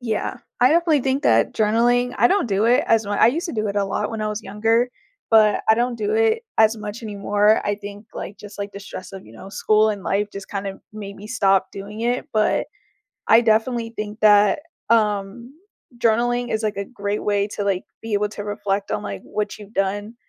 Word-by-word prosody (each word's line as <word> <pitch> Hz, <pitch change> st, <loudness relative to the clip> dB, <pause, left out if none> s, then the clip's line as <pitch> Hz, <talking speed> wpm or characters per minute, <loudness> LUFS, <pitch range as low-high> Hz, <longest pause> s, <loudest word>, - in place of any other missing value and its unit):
Yeah. 240 Hz, +1 st, -3 dB, 0.2 s
I 250 Hz, +1 st, +6 dB
definitely 325 Hz, -2 st, +3 dB
think 265 Hz, +2 st, 0 dB
that 115 Hz, 0 st, +3 dB
journaling 240 Hz, +3 st, +2 dB
I 235 Hz, +3 st, +5 dB
don't 395 Hz, -3 st, +2 dB
do 200 Hz, +1 st, +1 dB
it 240 Hz, +2 st, +4 dB
as 225 Hz, -1 st, +3 dB
mu 205 Hz, -, -4 dB
I 205 Hz, -, +5 dB
used 300 Hz, +9 st, 0 dB
to 335 Hz, -, -5 dB
do 215 Hz, -2 st, -1 dB
it, 200 Hz, -, -4 dB
a 200 Hz, -, +2 dB
lot, 195 Hz, -, -2 dB
when 225 Hz, -1 st, -4 dB
I 215 Hz, -, -1 dB
was 210 Hz, +1 st, -4 dB
younger, 225 Hz, +4 st, +1 dB, 0.4 s
but 215 Hz, -2 st, +5 dB
I 220 Hz, -, +7 dB
don't 240 Hz, +1 st, 0 dB
do 415 Hz, -, -2 dB
it 450 Hz, 0 st, +2 dB
as 220 Hz, 0 st, +4 dB
much 215 Hz, +2 st, -7 dB
anymore. 205 Hz, 0 st, +2 dB
I 205 Hz, -, 0 dB
think, 205 Hz, +1 st, -10 dB
like, 200 Hz, -, -6 dB
just, 205 Hz, 0 st, -12 dB
like, 200 Hz, 0 st, -5 dB
the 200 Hz, -, -8 dB
stress 190 Hz, -1 st, -9 dB
of, 190 Hz, -, -10 dB
you 110 Hz, -, -15 dB
know, 150 Hz, +12 st, -11 dB
school 215 Hz, +2 st, +2 dB
and 205 Hz, -2 st, -5 dB
life, 200 Hz, +2 st, 0 dB
just 195 Hz, -1 st, -8 dB
kind 200 Hz, -1 st, -4 dB
of, 195 Hz, 0 st, -6 dB
made 200 Hz, -2 st, -8 dB
me 205 Hz, -, -10 dB
stop 195 Hz, -4 st, +2 dB
doing 205 Hz, +2 st, -8 dB
it, 245 Hz, +4 st, -1 dB
but 215 Hz, -1 st, +1 dB, 0.6 s
I, 225 Hz, -, +7 dB
definitely, 230 Hz, +1 st, +1 dB
think 210 Hz, +1 st, -5 dB
that, 210 Hz, +1 st, +5 dB, 0.3 s
um, 215 Hz, +2 st, 0 dB, 0.4 s
journaling 240 Hz, +1 st, +1 dB
is, 220 Hz, 0 st, -1 dB
like, 215 Hz, -2 st, -1 dB
a 200 Hz, -, -3 dB
great 205 Hz, -2 st, -4 dB
way 205 Hz, -1 st, +1 dB
to, 205 Hz, -, -4 dB
like, 195 Hz, -2 st, 0 dB, 0.2 s
be 225 Hz, -1 st, -5 dB
able 205 Hz, 0 st, +1 dB
to 205 Hz, 0 st, -7 dB
reflect 205 Hz, -1 st, -2 dB
on, -, -, -1 dB
like, 100 Hz, -1 st, -5 dB
what 210 Hz, -1 st, -4 dB
you've 210 Hz, 0 st, -13 dB
done 205 Hz, +3 st, -2 dB
215 Hz, 220 wpm, -22 LUFS, 200-230 Hz, 0.6 s, I